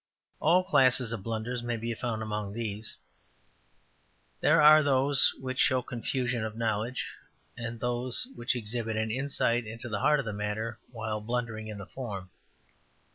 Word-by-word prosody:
All 180 +2 +4
classes 130 -7 +3
of 115 -4 -3
blunders 115 +3 -3
may 120 -1 -2
be 115 +1 -3
found 115 -2 -3
among 105 -2 -3
these. 110 -1 -4 1.4
There 155 +2 +4
are 155 +1 +9
those 140 0 +4
which 130 0 -4
show 130 -1 +3
confusion 125 -1 -2
of 110 0 -5
knowledge, 115 +2 -1 0.4
and 115 0 -5
those 125 - 0
which 120 +2 -1
exhibit 115 -1 -3
an 110 0 0
insight 120 -2 0
into 115 +2 -6
the 105 -2 -2
heart 150 +6 +4
of 140 - -3
the 110 - -3
matter 105 +2 -3
while 110 -2 -3
blundering 115 -1 -3
in 105 -1 -6
the 100 - -7
form. 100 -7 -6
115 Hz, 155 wpm, -29 LUFS, 110-130 Hz, 1.4 s, are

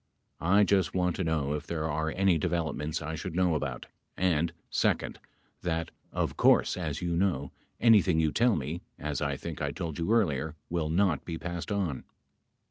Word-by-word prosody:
I 100 +5 +4
just 95 -3 +2
want 90 -2 +1
to 95 - 0
know 80 -4 0
if 75 - -4
there 80 -2 -2
are 80 0 -1
any 95 -1 +2
developments 80 -1 -1
I 80 +1 -4
should 85 +2 -5
know 90 -2 +3
about 70 -5 -3 0.3
and, 85 -3 +2 0.2
second, - - 0 0.4
that 80 -1 -2 0.2
of - - -1
course - - +4
as 80 -2 -3
you 85 -1 0
know, 85 -7 0 0.3
anything 100 -8 +5
you 80 -1 +2
tell 120 +4 +3
me, 75 +4 -3 0.2
as 75 -1 -3
I 70 -2 -1
think - - -6
I - - 0
told 80 -3 -5
you 85 +6 0
earlier, 80 - +1 0.2
will 85 -3 0
not 85 -2 +2
be 85 -2 -4
passed 85 0 -5
on. 95 -9 -1
80 Hz, 180 wpm, -29 LUFS, 75-90 Hz, 0.4 s, anything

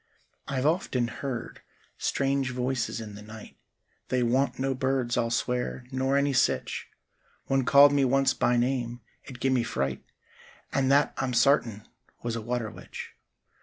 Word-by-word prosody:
I've 135 -1 -1
often 145 -7 +1
heard 125 0 -5 0.4
strange 135 -1 0
voices 125 -2 -2
in 110 -2 -7
the 100 - -10
night— 110 +1 -11 0.5
They 125 -1 +1
wan't 130 +4 +1
no 135 +1 0
birds 130 -2 0
I'll 115 - +1
swer, 125 +2 -2
nor 130 +1 +1
any 140 0 +2
sitch— 130 - 0 0.6
One 135 -1 +1
called 140 +2 +7
me 140 -1 +3
once 135 +1 +3
by 120 - +2
name; 120 -1 -1 0.2
it 125 -2 -10
gim'me 130 0 +2
fright— 70 - -2 0.7
And 135 -1 +2
that 145 +1 +4
I'm 130 -2 -1
sartin 115 -4 +2 0.4
was 120 -1 -2
a 115 - -3
water 115 -1 -3
witch. - - -9
125 Hz, 150 wpm, -27 LUFS, 120-135 Hz, 0.7 s, called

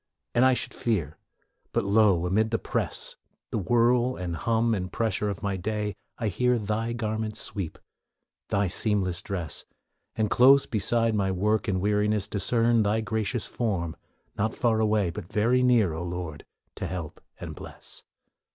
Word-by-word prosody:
And 120 - +4
I 130 -1 +5
should - - -3
fear, 85 - -1 0.5
but - - +1
lo! 100 -4 +4
amid 110 +5 +2
the 115 - +1
press, - - -3 0.3
The - - 0
whirl 120 +5 +3
and 90 -2 -4
hum 115 +6 +1
and 90 -3 -3
pressure 105 -2 0
of 100 0 -5
my 100 -1 -1
day, 105 +2 -2 0.2
I 115 - -1
hear 125 +5 +2
Thy 110 +2 -2
garment's 110 -2 -2
sweep, 95 -6 -4 0.7
Thy 100 0 +2
seamless 95 -2 +2
dress, 90 -5 -4 0.5
And 110 -2 0
close 135 +2 +6
beside 115 +1 +1
my 100 -2 +1
work 105 +4 +1
and 95 -2 +1
weariness 105 +1 +1
Discern 115 +2 +2
Thy 105 +2 +1
gracious 110 +2 -2
form, 90 -9 -2 0.4
not 110 +2 -1
far 115 -3 +2
away, 105 -4 +2
But 95 0 -8
very 120 +4 +3
near, 120 -9 +4
O 80 - -4
Lord, 85 -3 -5 0.3
to - - -3
help 85 -5 -6 0.2
and - - -6
bless. - - -8
105 Hz, 160 wpm, -27 LUFS, 95-115 Hz, 0.7 s, close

